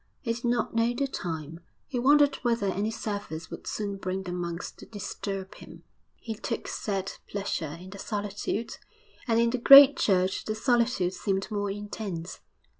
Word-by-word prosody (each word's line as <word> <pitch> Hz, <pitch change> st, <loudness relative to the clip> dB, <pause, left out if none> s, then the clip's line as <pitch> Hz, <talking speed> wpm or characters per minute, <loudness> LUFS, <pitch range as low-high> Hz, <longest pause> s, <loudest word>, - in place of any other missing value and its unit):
He 230 Hz, -3 st, -1 dB
did 235 Hz, -, -8 dB
not 240 Hz, -1 st, 0 dB
know 230 Hz, +1 st, +2 dB
the 275 Hz, -, 0 dB
time; 165 Hz, -, -5 dB, 0.3 s
he 255 Hz, -4 st, -3 dB
wondered 285 Hz, +2 st, +5 dB
whether 235 Hz, -4 st, 0 dB
any 200 Hz, +2 st, 0 dB
service 205 Hz, -7 st, -5 dB
would -, -, -8 dB
soon 200 Hz, -2 st, -3 dB
bring 190 Hz, 0 st, -3 dB
the 180 Hz, -, -5 dB
monks 175 Hz, -1 st, -4 dB
to -, -, -14 dB
disturb 195 Hz, -2 st, -5 dB
him. -, -, -13 dB, 0.3 s
He 225 Hz, -, -6 dB
took 230 Hz, +2 st, -4 dB
sad 195 Hz, -2 st, -3 dB, 0.2 s
pleasure 170 Hz, -6 st, -3 dB
in 185 Hz, +1 st, -11 dB
the 200 Hz, -, -9 dB
solitude, 205 Hz, +2 st, -3 dB, 0.5 s
and 230 Hz, -1 st, +3 dB
in 235 Hz, 0 st, +3 dB
the 250 Hz, -, -1 dB
great 275 Hz, +3 st, +10 dB
church 185 Hz, -2 st, +1 dB
the 215 Hz, -, -2 dB
solitude 230 Hz, -6 st, +1 dB
seemed 195 Hz, +1 st, -2 dB
more 205 Hz, -1 st, -1 dB
intense. 200 Hz, -4 st, -5 dB
205 Hz, 170 wpm, -28 LUFS, 190-235 Hz, 0.5 s, great